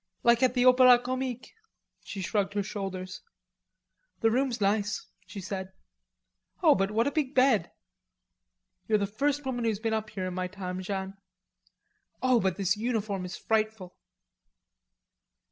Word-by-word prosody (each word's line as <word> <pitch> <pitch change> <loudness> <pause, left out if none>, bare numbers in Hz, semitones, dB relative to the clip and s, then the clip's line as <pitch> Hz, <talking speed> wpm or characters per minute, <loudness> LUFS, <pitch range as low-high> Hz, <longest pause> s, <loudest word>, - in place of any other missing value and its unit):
"Like 235 0 +4
at 255 -1 +3
the 250 0 +3
Opera 255 -1 +8
Comique." 255 0 -4 0.5
She 195 - -6
shrugged 200 +2 -1
her 205 - +1
shoulders. 190 -2 -5 1.0
"The 225 -1 +3
room's 255 0 0
nice," 205 +1 0 0.2
she 185 +2 -8
said. 190 0 -5 0.9
"Oh, 310 -3 +7
but, 195 -3 0
what 225 +2 +1
a 285 - 0
big 290 -3 -1
bed!" 255 -9 +4 1.2
"You're 215 - +3
the 200 - 0
first 280 +8 -1
woman 245 -2 -2
who's 225 -3 0
been 220 +1 -2
up 220 -1 -2
here 195 -4 -4
in 185 - -4
my 185 0 -2
time, 185 -1 -6
Jeanne.... 190 0 -4 1.0
Oh, 255 -2 +3
but 190 -4 0
this 195 0 +1
uniform 210 -4 -2
is 180 - -6
frightful." 215 -4 -1
215 Hz, 145 wpm, -28 LUFS, 195-245 Hz, 1.2 s, Opera